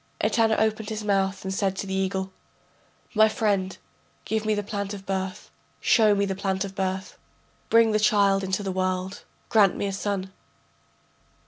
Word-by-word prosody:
Etana 225 -1 +2
opened 220 0 0
his 215 -1 -4
mouth 195 -1 0
and 190 - -2
said 195 -1 0
to 195 - -4
the 190 - -4
eagle: 190 0 -1 0.8
My 220 0 +5
friend, 200 -4 0 0.5
give 220 -1 -1
me 215 - +2
the 205 - -2
plant 200 0 -4
of 195 -1 -11
birth, 190 0 -4 0.3
show 215 -3 +4
me 200 0 +1
the 195 - -2
plant 190 0 -1
of 195 - -8
birth, 190 0 -3 0.5
Bring 230 -1 +5
the 215 - +2
child 200 -2 +3
into 190 +2 -1
the 195 - -2
world, 185 0 -2 0.3
grant 205 -5 +4
me - - -2
a 195 - -2
son.... 195 -1 -3
195 Hz, 175 wpm, -25 LUFS, 190-210 Hz, 0.8 s, My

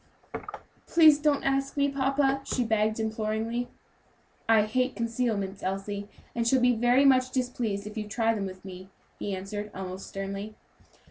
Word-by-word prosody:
"Please 315 -3 +6
don't 295 -1 +2
ask 275 +1 0
me, 280 0 +3
papa," 275 0 +1
she 255 - -1
begged 220 -1 +1
imploringly. 220 +2 -2 0.8
"I 220 -2 +6
hate 255 +5 0
concealments, 225 -4 -2
Elsie, 200 +2 -3 0.2
and 230 -1 0
shall 260 +2 +4
be 245 0 +4
very 245 +4 +4
much 255 -2 +5
displeased 245 -6 -2
if 210 +1 -8
you 215 -1 -4
try 225 +1 +1
them 200 -3 -2
with 185 0 -10
me," 185 0 -9 0.3
he 200 - -2
answered, 205 +2 -5
almost 190 0 -6
sternly. 195 +2 -5
225 Hz, 150 wpm, -28 LUFS, 205-255 Hz, 0.8 s, Please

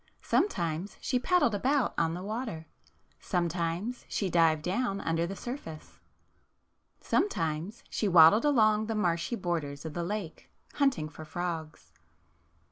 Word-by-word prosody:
Sometimes 175 - 0
she 255 - 0
paddled 350 - +2
about 265 +6 +1
on 165 0 0
the 180 - -6
water. 215 -6 -4 0.5
Sometimes 175 +5 -2
she 195 -4 -1
dived 160 -3 +3
down 195 +2 -1
under 165 -1 0
the 195 - -5
surface. 195 - -8 1.0
Sometimes 170 - -1
she 215 - -1
waddled 175 +4 +7
along 215 -6 +3
the 225 - -2
marshy 175 +2 0
borders 165 -7 -3
of 160 - -5
the 175 - -2
lake 190 -2 -5 0.2
hunt 275 -3 +2
ing 155 - -3
for 155 +1 -10
frogs. 160 - -5
180 Hz, 130 wpm, -29 LUFS, 165-220 Hz, 1.0 s, waddled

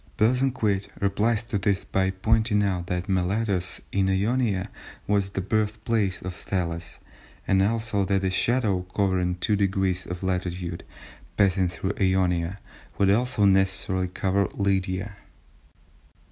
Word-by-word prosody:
Bosanquet 115 -4 +1
replies 105 +3 +1
to 115 -3 -2
this 100 0 0
by 95 0 0
pointing 105 +2 +2
out 90 -3 -1
that 90 +2 -2
Miletus, 95 0 0
in 95 -1 +1
Ionia, 100 0 0 0.3
was 100 -1 +1
the 95 - -3
birthplace 105 0 -1
of 90 0 -4
Thales, 85 -2 -4 0.5
and 95 0 +3
also 110 0 0
that 95 0 +1
a 95 - +1
shadow, 110 -3 +1
covering 95 -3 +1
two 105 +4 +1
degrees 95 -2 0
of 90 +1 -6
latitude, 90 -2 -3 0.5
passing 95 -2 +3
through 95 +3 -3
Ionia, 95 -1 +1 0.4
would 100 -1 +4
also 120 0 +2
necessarily 95 -1 +2
cover 95 +2 0
Lydia. 100 0 -1
95 Hz, 125 wpm, -25 LUFS, 95-105 Hz, 0.5 s, would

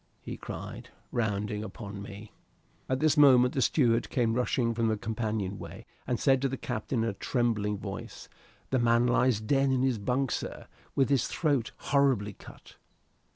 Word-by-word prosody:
he - - -5
cried, - - -8 0.2
rounding 105 -2 -1
upon 100 -1 -7
me. 100 +1 -9 0.6
At 130 0 0
this 155 -1 +3
moment 130 -4 +6
the 135 - 0
steward 115 -1 +2
came 115 -3 +1
rushing 120 -1 +1
from 115 0 0
the 110 -1 +1
companion 105 -2 -3
way, - - -9 0.2
and 125 -2 0
said 135 -2 +3
to 135 - +1
the 135 - -4
captain, 120 0 -2
in 115 - 0
a - - -9
trembling 105 -3 0
voice, - - -7 0.4
"The 130 - +2
man 120 0 +3
lies 125 -2 +3
dead 135 +5 +2
in 130 -1 +2
his 130 -4 +1
bunk, 125 +5 0
sir, - - -4 0.3
with 135 -1 +3
his 135 -4 +2
throat 140 -8 0
horribly 135 -8 +1
cut." - - -15
120 Hz, 170 wpm, -29 LUFS, 110-130 Hz, 0.6 s, moment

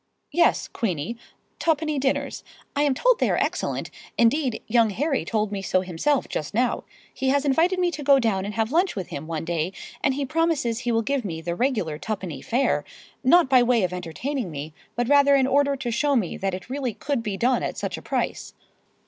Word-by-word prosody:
"Yes, 345 0 +3
Queenie—twopenny 240 - -3
dinners. 270 0 -1 0.3
I'm 285 -2 +2
told - - +3
they - - +2
are - - +1
excellent—indeed, 240 0 -1
young 230 -1 +3
Harry 270 +7 0
told 215 -2 -1
me 200 -1 -3
so 185 -1 +1
himself 190 - 0
just 150 +5 -4
now. 245 +1 +1 0.3
He 265 0 -1
has 280 +1 +2
invited 330 +7 +3
me 355 -1 +2
to 310 - -6
go 280 -1 +5
down 220 -7 +1
and 205 +1 -5
have 225 +1 0
lunch 350 +4 +2
with 190 -4 -5
him 145 +2 -6
one 165 -1 -3
day, 170 +2 -1 0.3
and 270 -2 +2
he 280 0 -1
promises 305 -6 0
he 240 -1 -1
will 225 0 +2
give 275 +1 -1
me 165 -5 -4
the 170 +1 -3
regular 205 - -1
twopenny 190 -5 -4
fare—not 270 +5 +1
by 260 -2 +5
way 240 -3 +3
of 180 0 -1
entertaining 180 - -3
me, 150 0 -6 0.2
but 240 0 0
rather 285 0 +6
in 270 -1 +4
order 280 +1 +3
to 260 -3 -3
show 285 +5 +1
me 205 -9 0
that 195 -1 -2
it 185 - -9
really 255 -3 -3
could 280 -4 -2
be 210 -4 -3
done 245 +4 +2
at - - -3
such - - -3
a - - -8
price." - - -3
245 Hz, 200 wpm, -24 LUFS, 195-280 Hz, 0.3 s, rather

